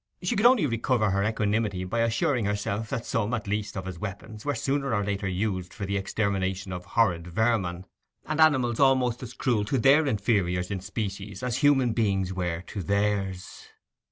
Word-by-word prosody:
She 180 Hz, -, 0 dB
could 215 Hz, +4 st, +6 dB
only 245 Hz, -9 st, +4 dB
recover 115 Hz, -3 st, +1 dB
her 100 Hz, +1 st, +1 dB
equanimity 105 Hz, -2 st, 0 dB
by 95 Hz, +6 st, -2 dB
assuring 115 Hz, +2 st, +1 dB
herself 105 Hz, +1 st, -2 dB
that 115 Hz, -, -3 dB
some, 115 Hz, +1 st, 0 dB
at 110 Hz, -, -5 dB
least, 105 Hz, 0 st, -2 dB
of 95 Hz, -, -4 dB
his 90 Hz, -3 st, -6 dB
weapons 105 Hz, +2 st, -7 dB
were 145 Hz, -1 st, -1 dB
sooner 135 Hz, 0 st, 0 dB
or 105 Hz, -, 0 dB
later 100 Hz, 0 st, -2 dB
used 95 Hz, -1 st, -2 dB
for 100 Hz, -, -4 dB
the 100 Hz, +1 st, -2 dB
extermination 95 Hz, -1 st, -1 dB
of 90 Hz, 0 st, -6 dB
horrid 90 Hz, -5 st, +1 dB
vermin 95 Hz, -2 st, 0 dB, 0.4 s
and 155 Hz, +1 st, 0 dB
animals 130 Hz, -7 st, +3 dB
almost 130 Hz, -3 st, +3 dB
as 125 Hz, -1 st, -7 dB
cruel 120 Hz, -5 st, +1 dB
to 130 Hz, -, 0 dB
their 140 Hz, +5 st, +5 dB
inferiors 100 Hz, -6 st, 0 dB
in 100 Hz, -, -2 dB
species 100 Hz, 0 st, -5 dB
as 125 Hz, -1 st, -1 dB
human 135 Hz, -4 st, +3 dB
beings 95 Hz, -5 st, 0 dB
were 90 Hz, -2 st, -2 dB
to 100 Hz, +2 st, -6 dB
theirs. 100 Hz, -1 st, -2 dB
105 Hz, 185 wpm, -27 LUFS, 95-120 Hz, 0.4 s, could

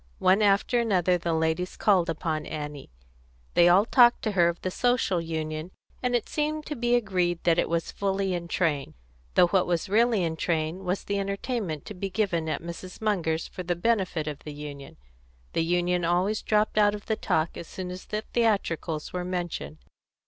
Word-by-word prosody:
One 190 Hz, +3 st, +4 dB
after 205 Hz, +4 st, +3 dB
another 185 Hz, -6 st, +2 dB
the 170 Hz, 0 st, -2 dB
ladies 160 Hz, +2 st, -1 dB
called 185 Hz, -5 st, +3 dB
upon 160 Hz, -1 st, -2 dB
Annie. 150 Hz, -2 st, -6 dB, 0.6 s
They 175 Hz, 0 st, +6 dB
all 190 Hz, +4 st, +5 dB
talked 240 Hz, 0 st, +5 dB
to 215 Hz, -, 0 dB
her 175 Hz, -4 st, +4 dB
of 170 Hz, -, -4 dB
the 185 Hz, -, -2 dB
Social 245 Hz, -6 st, +1 dB
Union, 160 Hz, 0 st, -4 dB, 0.3 s
and 250 Hz, -1 st, +1 dB
it 240 Hz, -, 0 dB
seemed 305 Hz, 0 st, -2 dB
to 300 Hz, -, -4 dB
be 240 Hz, -1 st, +2 dB
agreed 180 Hz, -7 st, 0 dB
that 170 Hz, -1 st, +3 dB
it -, -, +1 dB
was 170 Hz, 0 st, -1 dB
fully 195 Hz, -1 st, -1 dB
in 170 Hz, -1 st, -3 dB
train, 155 Hz, -6 st, -1 dB, 0.4 s
though -, -, +7 dB
what 190 Hz, -1 st, +2 dB
was 175 Hz, +2 st, -1 dB
really 225 Hz, -1 st, +3 dB
in 160 Hz, -1 st, -2 dB
train 165 Hz, +3 st, -1 dB
was 180 Hz, +2 st, -1 dB
the 200 Hz, 0 st, -1 dB
entertainment 195 Hz, -, -3 dB
to -, -, -7 dB
be 195 Hz, +1 st, -4 dB
given 180 Hz, -5 st, 0 dB
at 155 Hz, -, -3 dB
Mrs. 170 Hz, +2 st, -8 dB
Munger's 170 Hz, -7 st, 0 dB
for -, -, -7 dB
the 175 Hz, 0 st, -1 dB
benefit 185 Hz, -5 st, 0 dB
of 150 Hz, -2 st, -4 dB
the 150 Hz, -, -8 dB
Union; 145 Hz, -2 st, -9 dB, 0.6 s
the 165 Hz, -, +1 dB
Union 175 Hz, +1 st, +1 dB
always 180 Hz, +5 st, +1 dB
dropped 215 Hz, 0 st, +1 dB
out 205 Hz, 0 st, +4 dB
of 205 Hz, -, -10 dB
the 220 Hz, -, 0 dB
talk 160 Hz, -5 st, 0 dB
as 170 Hz, -, -7 dB
soon 185 Hz, -1 st, -6 dB
as 180 Hz, +1 st, -8 dB
the 215 Hz, 0 st, -3 dB
theatricals 185 Hz, -9 st, 0 dB
were 180 Hz, 0 st, -2 dB
mentioned. 175 Hz, -, -4 dB
180 Hz, 190 wpm, -27 LUFS, 165-205 Hz, 0.6 s, though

